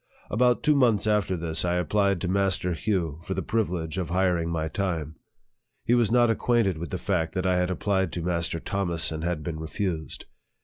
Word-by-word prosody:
About 125 +3 +2
two 150 - +4
months 120 -8 +3
after 105 -4 +1
this, 80 -1 -1
I 90 0 +1
applied 100 0 +1
to 95 - -1
Master 95 -1 +1
Hugh 85 -5 -1
for 95 - -4
the - - -2
privilege 90 -6 -1
of 85 -4 -3
hiring 90 -2 +1
my 80 -1 -1
time. 80 -3 -3 0.7
He 120 - +3
was 120 -3 +3
not 120 0 +4
acquainted 110 -6 +1
with 85 - -5
the 90 - -3
fact 90 -4 -1
that 95 0 -1
I 90 -1 +2
had 90 0 0
applied 95 -1 0
to 85 - -3
Mas 85 -1 0
ter - - -3
Thomas, 85 -2 0
and 80 0 -4
had 85 -3 -2
been 80 -1 -4
refused. 80 0 -4
90 Hz, 205 wpm, -26 LUFS, 85-100 Hz, 0.7 s, two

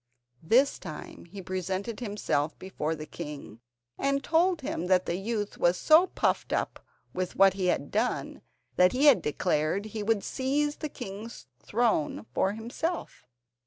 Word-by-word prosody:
This 245 - +3
time 155 -5 -9
he 190 +3 -9
presented 185 +4 -3
himself 205 - -1
before 165 -4 -3
the 155 0 -7
king 150 -10 -8 0.4
and 275 0 +1
told 340 +1 +2
him 180 -9 -3
that 185 0 +3
the - - -1
youth 205 +2 -3
was 175 +1 +3
so 320 - +6
puffed - - 0
up - - -2 0.3
with 185 -1 -3
what 195 -1 +6
he 190 -2 -1
had 145 -5 0
done 225 +4 -1 0.4
that 180 0 +5
he 265 +4 +2
had 285 -4 +7
declared 155 +6 0
he 215 0 -5
would 210 -1 +1
seize 290 +3 -1
the 305 - -4
king's 210 - -8 0.2
throne 200 - 0
for 190 +7 +1
himself. 235 - -4
200 Hz, 155 wpm, -28 LUFS, 175-250 Hz, 0.4 s, had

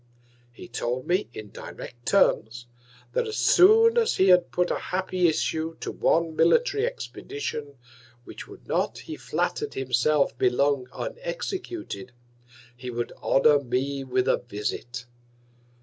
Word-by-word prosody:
He 120 - -12
told 125 +1 -3
me, 180 -1 0
in 110 -3 -9
direct 120 0 -10
Terms, 120 - +2 0.5
that - - 0
as 435 - -4
soon 450 +5 +6
as 455 - +1
he 190 0 +4
had 180 -1 +5
put 180 0 0
an - - 0
happy 185 -1 0
Issue 160 0 -1
to - - -4
one 165 -1 +1
Military 425 - +3
Expedition, 395 - -6 0.5
which - - -10
would - - -14
not, - - 0
he - - -7
flatter'd - - -2
himself, 135 +3 +1
be 125 - +4
long 140 +1 +1
unexecuted, 380 - -5 0.6
he 125 0 -7
would 120 0 -3
honour 145 +2 +4
me 135 +2 -2
with 130 -1 0
a - - +4
Visit. 120 +2 -5
150 Hz, 135 wpm, -26 LUFS, 125-205 Hz, 0.6 s, soon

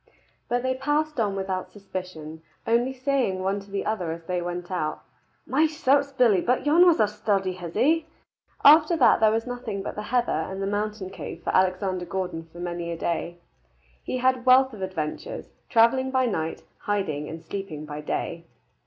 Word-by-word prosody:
But 245 +1 0
they 260 0 +1
passed 295 +2 -1
on 205 -3 +1
without 190 -1 -3
suspicion, 180 -6 -7 0.2
only 235 +3 +2
saying 255 -8 0
one 195 +2 0
to 200 0 -14
the 195 0 -3
other 205 -6 -1
as 165 +1 -6
they 180 +1 -2
went 175 +1 -5
out, 155 -4 -2 0.4
"My 295 +6 +3
certes, 280 -2 +2
Billy, 235 -8 +4
but 250 +7 0
yon 335 +5 +6
was 340 - +5
a 215 - +5
sturdy 200 -2 0
hizzie!" 265 - 0 0.6
After 310 +3 +7
that 265 - +5
there 220 - +5
was 225 +1 0
nothing 245 -5 -5
but - - -4
the 210 - -5
heather 245 -1 +1
and 190 0 -2
the 195 - -1
mountain 205 -1 -2
cave 170 -2 -8
for - - -1
Alexander 185 -1 +1
Gordon 170 -2 -4
for 175 - -14
many 175 -1 -4
a 170 - -4
day. 170 +1 -2 0.7
He - - -3
had 255 0 +2
wealth 260 0 +6
of 210 - -9
adventures, 185 - -4 0.2
travelling 260 +3 +4
by 260 -1 +2
night, 165 -8 -2 0.2
hiding 155 -8 -2
and 160 +1 -8
sleeping 160 -6 -6
by 150 0 -6
day. 165 +2 -4
200 Hz, 180 wpm, -25 LUFS, 175-255 Hz, 0.7 s, After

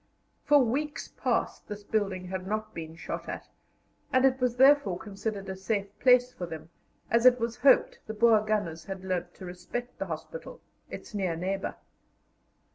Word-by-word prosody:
For 295 - +6
weeks 290 +6 -2
past - - -2
this 210 0 -7
building 195 -3 -1
had 185 0 -5
not 215 +1 -3
been 160 -1 -7
shot - - -6
at, - - -6 0.6
and 255 +1 +4
it 265 0 +3
was 250 -1 +1
therefore 265 -8 +5
considered 200 0 -5
a 190 - -4
safe 200 +1 -1
place 250 0 +5
for 175 - -5
them, 160 -1 -8 0.4
as 235 +2 +5
it 250 0 +6
was 230 0 -2
hoped 275 +1 +4
the 220 - -5
Boer 225 -1 +5
gunners 205 -7 -2
had 190 -1 -6
learned 175 -1 -3
to 185 - -10
respect 210 +8 -6
the - - -3
hospital, - - -7 0.3
its - - -9
near 190 -5 -1
neighbour. 190 +4 -3
210 Hz, 170 wpm, -29 LUFS, 185-245 Hz, 0.6 s, For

